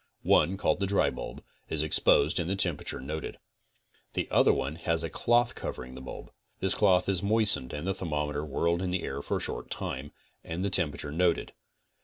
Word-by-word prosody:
One, 95 +2 +4
called - - +1
the 100 - 0
dry 100 +1 +2
bulb, - - -7 0.3
is 80 -1 +1
exposed 75 +1 +3
and 85 0 -1
the 95 - +1
temperature 90 -6 -1
moted. 75 +4 -5 0.8
The - - -1
other - - +6
one 70 +4 -2
has 85 -1 0
a 80 - -3
cloth 120 +5 +3
covering 65 0 -6
the 65 - -8
bulb. 65 - -8 0.3
This 95 -1 +1
cloth 95 -4 +3
is 95 -3 +1
mois 110 +1 +4
tened 65 - -7
and 75 +3 -5
the 95 - +1
thermometer 75 -4 -2
whirled 85 +4 0
in 95 - -1
the 90 0 -1
air 70 +1 -3
for - - -1
a - - -3
short - - -4
time, 70 +3 -4 0.3
and 85 +2 -4
the 100 - 0
temperature 75 -5 0
noted. 85 +2 +1
85 Hz, 200 wpm, -29 LUFS, 75-95 Hz, 0.8 s, other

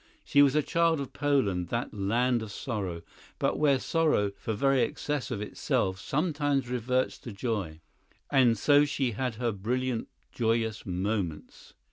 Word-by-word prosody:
She 145 - +4
was 140 0 +5
a 150 - +3
child 165 0 +2
of 140 - -6
Poland, 130 - +1
that 115 +6 -3
land 115 +5 +1
of 110 -2 -6
sorrow, 95 -8 -4 0.3
but - - 0
where 145 -3 +4
sorrow, 150 -9 +1
for 110 - -3
very 135 +3 +3
excess 150 +1 -2
of 110 -5 -3
itself, 95 -2 -1
sometimes 145 - 0
reverts 125 +1 0
to 120 - -8
joy. 100 -7 -3 0.5
And 125 -5 +4
so 145 +6 +5
she 145 -4 0
had 125 +1 -2
her 120 +1 -1
brilliant 120 +4 -2 0.2
joyous 115 -2 -1
moments. 90 -3 -3
120 Hz, 150 wpm, -29 LUFS, 105-140 Hz, 0.5 s, was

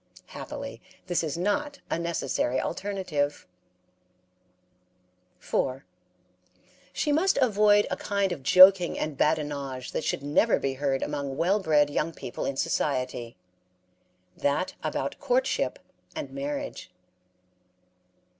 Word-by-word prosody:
Happily, - - -7 0.2
this 175 -2 0
is 155 -1 -3
not 285 +11 -1
a - - 0
necessary 145 -6 -1
alternative. 175 -7 -2 1.9
4. 130 0 -2 1.1
She 295 - -1
must 340 +6 +3
avoid 210 -5 +4
a - - +1
kind 200 -2 0
of 165 -6 -4
joking 185 +4 +7
and 155 -2 -3
badinage 140 -4 -1
that - - -2
should 140 - -2
never 150 +10 +3
be 135 - -1
heard 135 0 -1
among 140 -2 -3
well 190 +6 +2
bred 150 -6 +3
young 160 +3 -1
people 120 - -6
in 135 - -3
society 125 -6 -1 1.0
that 145 +6 0
about - - -3
courtship - - 0 0.4
and 310 -2 -5
marriage. 280 - -5
165 Hz, 110 wpm, -27 LUFS, 140-205 Hz, 1.9 s, joking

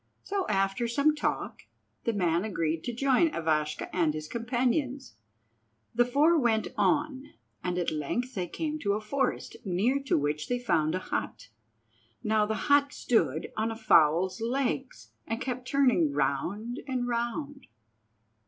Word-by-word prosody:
So, 390 -2 -2
after 195 +4 +1
some 280 +6 +3
talk, 300 - -2 0.4
the 230 - +1
man 175 -3 +1
agreed 165 -6 -1
to 245 - -1
join 270 +6 +3
Ivashka 155 -2 0
and 165 -4 +2
his 155 0 -5
companions. 250 - -1 0.8
The 240 +1 +4
four 300 +7 +4
went 225 -4 +1
on, 285 -2 0 0.3
and 180 -1 -1
at 175 - 0
length 195 - -2
they 180 -5 -2
came 310 - -3
to 200 -7 0
a 210 - -1
forest, 265 +6 -2
near 210 +8 +1
to - - +2
which 150 +1 -1
they 245 - 0
found 160 -10 +1
a 185 - -5
hut. 110 +1 -3 0.7
Now 215 -1 +2
the 220 - -1
hut 285 0 +4
stood 160 - 0
on 220 +1 0
a 225 - -4
fowl's 185 -2 +3
legs, 260 +2 -2 0.2
and 225 +1 -2
kept 255 -1 -4
turning 250 - +3
round 175 - -1
and 250 -2 -1
round. 245 +4 -3
230 Hz, 150 wpm, -29 LUFS, 175-265 Hz, 0.8 s, The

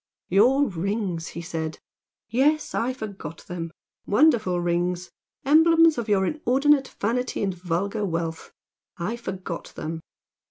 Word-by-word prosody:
"Your 250 +10 +5
rings!" 190 -2 -2
he 170 - -7
said 160 -2 -4 0.5
"Yes 285 +7 +2
I 240 +3 0
forgot 200 -10 -8
them! 165 -2 -5 0.4
Wonderful 215 - +3
rings! 175 +1 -1 0.3
emblems 320 0 +6
of 230 -2 -4
your 195 -2 +3
inordinate 280 - +2
vanity 240 +2 -1
and 195 -2 0
vulgar 185 +4 -2
wealth 165 -3 -3 0.5
I 190 +7 -2
forgot 190 -6 -6
them! 160 +1 -4
200 Hz, 120 wpm, -25 LUFS, 175-250 Hz, 0.5 s, emblems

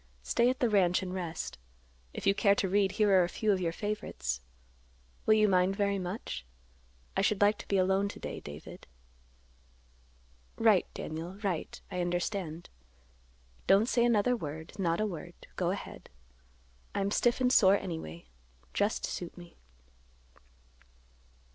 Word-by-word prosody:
Stay 235 - +3
at 260 - -1
the 245 - +3
ranch 190 -4 +3
and 185 -1 -5
rest. 170 - -4 0.5
If - - -7
you 195 - +5
care 200 0 +4
to 195 - 0
read, 195 0 +2
here 210 -2 +3
are 185 -2 +6
a 175 - -1
few 215 +3 0
of 190 -2 +1
your 170 -2 0
favorites. 165 - -3 0.9
Will 215 - +7
you 215 -1 +4
mind 185 0 +3
very 200 0 +1
much? 180 - -5 0.7
I - - +2
should 200 0 +2
like 205 +1 +4
to - - -9
be 200 - +1
alone 190 +2 +2
to - - -9
day, - - -5
David." 75 +1 -10 1.7
"Right, - - +4
Daniel, 165 +4 -5
right. 185 -5 -2
I 180 -1 -2
understand. 175 -1 -2 1.0
Don't 200 +3 +6
say 240 -1 +2
another 240 +1 +3
word; 160 -5 -6
not 170 -3 +1
a 215 - +2
word. 175 -7 -6 0.2
Go - - 0
ahead. - - -6 0.9
I'm 200 0 0
stiff 240 +3 +2
and 250 0 +3
sore 195 -4 +6
anyway; 160 - -6 0.5
just 205 +2 0
suit 175 0 -6
me." 175 -1 -12
195 Hz, 150 wpm, -31 LUFS, 175-205 Hz, 1.7 s, Will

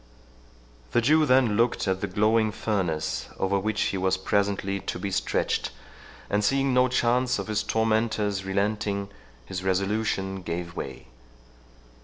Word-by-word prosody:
The - - +4
Jew 155 +5 +4
then 125 -5 +4
looked 115 -2 +1
at 95 0 0
the - - -1
glowing 110 +2 +2
furnace, 80 - -2
over 100 +1 +1
which 105 +2 -2
he 95 - -1
was 95 0 +1
presently 100 0 0
to - - -4
be 100 - -4
stretched, 95 - 0 0.6
and 105 +1 0
seeing 135 +4 +2
no 125 0 +5
chance 125 0 +2
of - - -3
his 110 -1 0
tormentor's 110 -3 0
relenting, 100 +1 -1 0.4
his 95 +5 -5
resolution 95 0 -1
gave 85 0 -5
way. 65 - -6
105 Hz, 140 wpm, -26 LUFS, 95-110 Hz, 0.6 s, no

